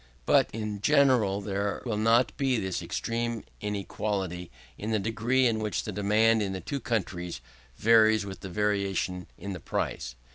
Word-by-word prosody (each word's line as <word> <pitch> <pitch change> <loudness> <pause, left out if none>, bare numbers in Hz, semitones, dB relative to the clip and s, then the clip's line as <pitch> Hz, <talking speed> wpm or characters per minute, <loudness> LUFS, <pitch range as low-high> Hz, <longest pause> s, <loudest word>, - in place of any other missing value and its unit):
But - - +4
in 105 -2 -4
general 125 -7 +4
there 100 0 -2
will 115 -3 -1
not 115 +3 +3
be 135 -3 +1
this 95 -4 -2
extreme 115 -1 -2 0.2
inequality 100 -3 -3 0.3
in 105 - -5
the 110 - +2
degree 115 +5 +1
in 115 -2 +2
which 105 -1 -2
the 105 - -4
demand 110 +3 +3
in 100 -2 -1
the 95 - -3
two 140 +7 -4
countries 90 - -3 0.4
varies 110 -1 +5
with 95 -1 -8
variations 95 -2 -1
in 100 +2 -5
the 90 - -6
price. - - -3
105 Hz, 155 wpm, -28 LUFS, 95-115 Hz, 0.4 s, varies